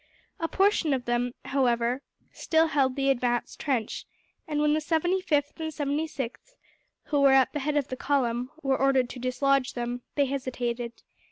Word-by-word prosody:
A 330 - 0
portion 380 -6 +2
of 250 -2 -5
them, 240 +1 0
however, 245 -2 +1 0.3
still 320 0 +2
held 265 -4 +2
the 275 0 +2
advanced 240 -2 -1
trench; 250 -7 -2 0.4
and 300 -1 -1
when 300 0 +3
the 310 - +2
75th 320 -2 0
and 320 -1 -2
76th, 290 - -3 0.5
who 290 -2 0
were 275 -1 +6
at 265 -1 +4
the 295 - -1
head 295 +2 0
of 280 -1 0
the 255 - -3
column, 250 -3 0
were 270 -1 +1
ordered 265 -2 +3
to 255 - -8
dislodge 255 +1 +1
them, 240 0 -3
they 285 - +3
hesitated. 245 -3 -3
275 Hz, 165 wpm, -27 LUFS, 245-295 Hz, 0.5 s, were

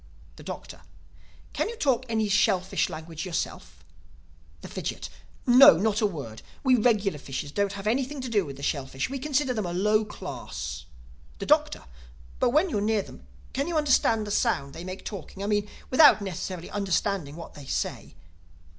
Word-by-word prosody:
The - - -13
Doctor: - - -8 0.7
"Can 305 +8 -1
you 470 - -6
talk 260 - +1
any 220 -1 +1
shellfish 195 -2 +2
language 160 0 -6
yourself?" 180 -3 -4 0.8
The - - -8
Fidgit: - - -5 0.4
"No, 245 -8 +9
not 215 +4 +1
a 210 - +4
word. 135 - -7 0.2
We 260 -2 +4
regular 210 -8 +2
fishes 140 +1 -5
don't 200 +3 0
have 200 0 -7
anything 265 +6 0
to 255 - -4
do 215 -4 +2
with 140 -4 -8
the 140 - -10
shellfish. 135 - -2
We 275 - -3
consider 280 -1 0
them 215 -6 -2
a 175 - -4
low 210 +4 +3
class." 75 - -6 0.5
The - - -5
Doctor: - - +2 0.6
"But 250 - +3
when 315 +8 +2
you're 205 - 0
near 215 -1 +1
them, - - -14 0.3
can 280 +3 -1
you 345 - -2
hear 305 - +3
the 225 -6 +3
sound 140 -7 0
they 170 - -8
make 185 +1 -7
talking—I 195 0 -6
mean 205 0 0 0.2
without 290 -2 +8
necessarily 185 -2 -5
understanding 195 -5 -1
what 170 - -9
they 145 -3 -11
say?" - - -3
205 Hz, 170 wpm, -27 LUFS, 170-245 Hz, 0.8 s, No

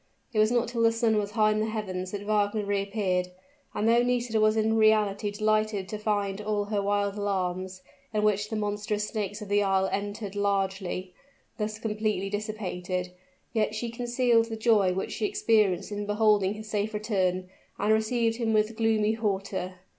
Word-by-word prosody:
It 215 - +1
was 215 0 +5
not 240 -1 +2
till 235 -1 -2
the 230 0 +5
sun 230 -1 +1
was 205 -1 0
high 215 -1 +4
in 215 - 0
the 215 - 0
heavens 190 -4 -4
that 205 +1 -5
Wagner 210 0 +1
reappeared; 200 -2 0 0.5
and 215 - 0
though 235 +1 +5
Nisida 245 -2 +1
was 215 +1 +4
in 220 0 +2
reality 215 -2 +3
delighted 215 -1 0
to 215 - -4
find 205 -2 -1
all 210 -1 -1
her 205 -1 -1
wild 200 0 0
alarms, 185 -2 -2 0.3
in 210 -1 0
which 210 0 +1
the 220 - -3
monstrous 210 0 -2
snakes 210 -1 -4
of - - -9
the 205 0 +3
isle 190 -1 +2
entered 205 0 -4
largely, 195 -2 -1 0.5
thus 210 0 -2
completely 215 -3 -2
dissipated, 185 -4 -3 0.4
yet 215 -2 0
she 230 +1 -3
concealed 240 -1 +2
the 225 - -4
joy 220 -4 +3
which 190 +1 -3
she 420 - -1
experienced 220 - +2
in 205 0 -4
beholding 210 -2 +3
his 215 0 -9
safe 215 0 -2
return, 185 -4 0 0.3
and 210 +2 +2
received 225 +1 +1
him 230 -2 0
with 215 +1 +2
gloomy 220 -1 +2
hauteur. 195 -4 -2
210 Hz, 175 wpm, -27 LUFS, 200-220 Hz, 0.5 s, was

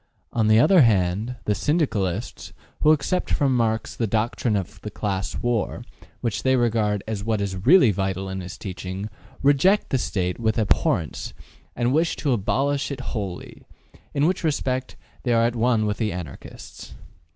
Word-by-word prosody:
On 110 -2 +2
the 110 0 +5
other 185 +7 +6
hand, 105 +1 +2
the 105 - +2
Syndicalists, 105 - -1 0.3
who 155 - +6
accept 155 +5 0
from 135 -3 +2
Marx 115 -2 0
the 115 - -1
doctrine 110 +1 0
of 95 -4 -4
the 105 - -5
class 100 -2 -3
war, 120 -3 -1 0.4
which 110 -2 -2
they 130 0 +3
regard 110 -4 +1
as 105 -3 -3
what 110 -1 0
is 95 0 -4
really 160 - +7
vital 95 0 -2
in 95 0 -4
his 90 0 -8
teaching, 95 +2 -6 0.3
reject 145 +9 +3
the 135 - +2
State 90 -5 -2
with 110 -2 0
abhorrence 95 -7 0 0.4
and 120 +1 +1
wish 165 +3 +2
to 140 -4 0
abolish 135 +6 0
it 140 -2 -5
wholly, 100 -6 -5 0.5
in 140 - +1
which 180 +2 0
respect 130 -4 -1 0.3
they 120 - 0
are 115 0 +4
at 120 +1 0
one 115 -2 +2
with 105 -1 -1
the 110 -3 -1
Anarchists. 85 -6 -9
110 Hz, 165 wpm, -24 LUFS, 100-130 Hz, 0.5 s, really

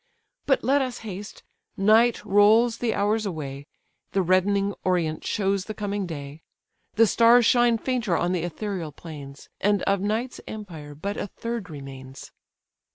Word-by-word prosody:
But 270 - +2
let 275 +2 +3
us 255 -2 -3
haste—Night 215 +3 0
rolls 220 +4 +4
the 235 -2 0
hours 210 +1 +1
away, 145 -5 -6 0.5
The 195 - +2
reddening 195 +3 +2
orient 170 -4 0
shows 195 -1 0
the 215 - -6
coming 205 -2 -3
day, 145 -1 -7 0.5
The 225 - +6
stars 235 +2 +5
shine 240 -1 +4
fainter 235 -8 -1
on 175 - 0
the 180 -2 0
ethereal 175 -1 -4
plains, 145 -3 -10
And 205 -1 +1
of 195 -1 +1
night's 220 +5 -2
empire 165 -9 -8
but 200 +7 -4
a - - -3
third 230 -1 -5
remains." 135 -3 -10
200 Hz, 145 wpm, -25 LUFS, 165-225 Hz, 0.5 s, The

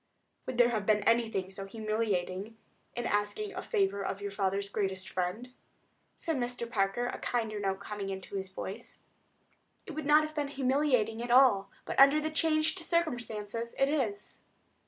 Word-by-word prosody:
"Would 255 - -3
there 240 0 +6
have 215 -3 -2
been 210 -1 +3
anything 225 -5 +1
so 195 0 -6
humiliating 215 -1 -2 0.4
in 240 - -2
your - - -1
asking 210 - -1
a 370 - -4
favor 200 0 0
of 195 - -3
your 200 0 -4
father's 200 0 0
greatest 190 -2 -2
friend?" 195 +8 -3 0.6
said 325 -3 -2
Mr. 245 -1 -3
Parker, 215 +1 0
a - - -4
kinder 225 -3 -1
note 195 -1 -1
coming 200 -1 -5
into 190 +1 -6
his 190 -1 -3
voice. 195 +4 -7 0.8
"It - - -7
would 310 -2 -4
not 300 +1 +6
have 310 0 -5
been 295 -2 -1
humiliating 260 -5 +1
at 240 - -4
all; 240 -6 +5 0.2
but, - - -2
under 275 +2 +8
the 310 +1 -2
changed 320 +2 +1
circumstances, 235 - -2
it 270 +1 +3
is." 225 -9 -2
225 Hz, 170 wpm, -31 LUFS, 200-270 Hz, 0.8 s, under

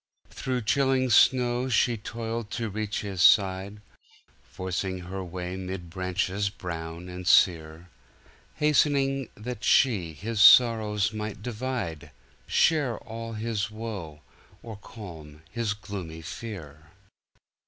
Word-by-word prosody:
Through 125 -2 -3
chilling 130 +1 +2
snow 125 +2 +4
she 120 0 +2
toiled 115 0 -5
to 115 -3 -3
reach 105 0 -3
his 100 -3 -4
side, 100 +2 +4 0.6
Forcing 95 0 -4
her 95 +2 -6
way 90 0 -5
mid 90 -2 -6
branches 95 +2 -1
brown 85 -2 -7
and 90 0 -7
sere, 80 -2 +3 0.7
Hastening 140 -3 +2
that 115 +1 -7
she 100 -12 +3
his 105 +7 -3
sorrows 110 -3 +6
might 105 -1 -5
divide, 115 - -4 0.4
Share 145 -8 +2
all 115 +1 -7
his 110 -1 -2
woe, 105 -9 -7 0.4
or 115 -2 -7
calm 80 -8 -11
his 115 -3 -2
gloomy 90 -6 -7
fear. 80 - -8
105 Hz, 110 wpm, -27 LUFS, 90-115 Hz, 0.7 s, sorrows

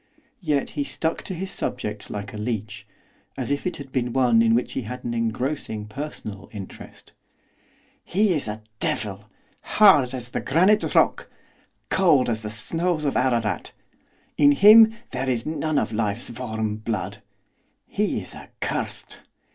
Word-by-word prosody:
Yet 150 -5 0
he 145 - -2
stuck 160 +3 -2
to 185 - -4
his 190 +3 -3
subject 105 -4 -3
like 100 0 -6
a - - -6
leech, 105 -1 -4 0.5
as - - -3
if 145 +5 -1
it 180 - -3
had 140 -2 -10
been 125 -2 -1
one 125 -4 +4
in 115 0 +4
which 120 - -1
he - - -2
had 125 +2 -7
an 120 - -3
engrossing 115 -1 -2
personal 105 -5 -7
interest. 100 -3 -10 0.9
'He 200 +1 +2
is 145 -8 0
a 105 +1 -5 0.2
devil, 100 -1 -2 0.4
hard 145 -12 +5
as 125 -1 -5
the - - -3
granite 185 +9 +3
rock, - - +3 0.6
cold 150 -10 +4
as 110 -1 -2
the 105 - -5
snows 165 +9 -1
of 140 - 0
Ararat. 115 -7 0 0.6
In 145 -1 +6
him 220 +6 +8 0.2
there 130 +1 -2
is 120 -3 -1
none 155 -1 -1
of 115 - 0
life's 110 +2 -2
warm 110 -3 -3
blood, 105 -2 -4 0.6
he - - -1
is - - -9
accursed! - - -5
125 Hz, 155 wpm, -24 LUFS, 110-150 Hz, 0.9 s, him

